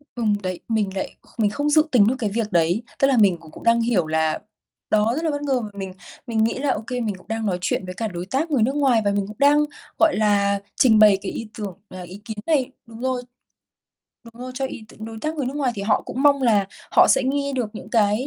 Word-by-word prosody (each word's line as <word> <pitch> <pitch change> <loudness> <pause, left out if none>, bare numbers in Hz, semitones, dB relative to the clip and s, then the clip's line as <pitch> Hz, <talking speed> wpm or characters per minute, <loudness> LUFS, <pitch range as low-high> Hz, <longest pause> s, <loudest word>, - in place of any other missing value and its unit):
Ừm, 220 -3 +1
đấy, 185 -1 -3
mình 215 -4 0
lại - - -4 0.2
mình 210 -2 +2
không 290 +7 -1
dự 310 +1 +5
tính 220 -6 +5
cho 260 - 0
cái 215 -4 0
việc 215 0 -2
đấy. 175 +6 +2 0.2
Tức 270 - +4
là 270 -3 +2
mình 195 -5 +4
cũng 160 -2 -15
cũng - - -12
đang 230 0 +4
hiểu 220 -9 +1
là 160 0 0 0.5
đó, 215 +2 +3
rất 320 - -3
là 315 - +1
bất 290 - -3
ngờ, 275 -3 0
và 215 - -6
mình 190 -1 -5 0.3
mình 225 -2 +1
nghĩ 225 - +1
là 280 -1 +1
OK, 215 +4 -7
mình 230 -5 -2
cũng - - -20
đang 225 0 -3
nói 185 -3 0
chuyện 185 - -1
với 185 - -6
cả 220 +5 -3
đối 175 -3 -6
tác 285 - -2
người 245 -6 +3
nước 265 +4 0
ngoài, 265 -6 +3
và 200 - +3
mình 200 -1 -1
cũng 210 0 -10
đang, 290 +1 +5 0.3
gọi 325 -2 +4
là, 200 -2 +2 0.2
trình 220 -4 +5
bày 210 -2 +7
cái 195 - -4
ý 225 -1 -6
tưởng, 200 -5 -5
à, 185 0 -8
ý 180 +3 -10
kiến 220 0 -6
này 280 -6 +1
đúng 225 0 -12
rồi, 255 -1 -1 1.0
đúng 230 +1 -12
rồi, 255 - -6
cho 270 - -2
ý 235 -4 -8
t - - -16
đối 220 +1 -7
tác 310 +1 -2
người 280 -4 -2
nước 270 +3 -4
ngoài 265 -4 0
thì 200 - -5
họ 210 +1 +2
cũng 265 - -4
mong 280 -2 +4
là 210 -5 +3 0.2
họ - - +6
sẽ 265 - +4
nghe 280 +1 -1
được 245 -5 -2
những - - -9
cái 215 +2 +2
225 Hz, 265 wpm, -22 LUFS, 200-260 Hz, 1.0 s, bày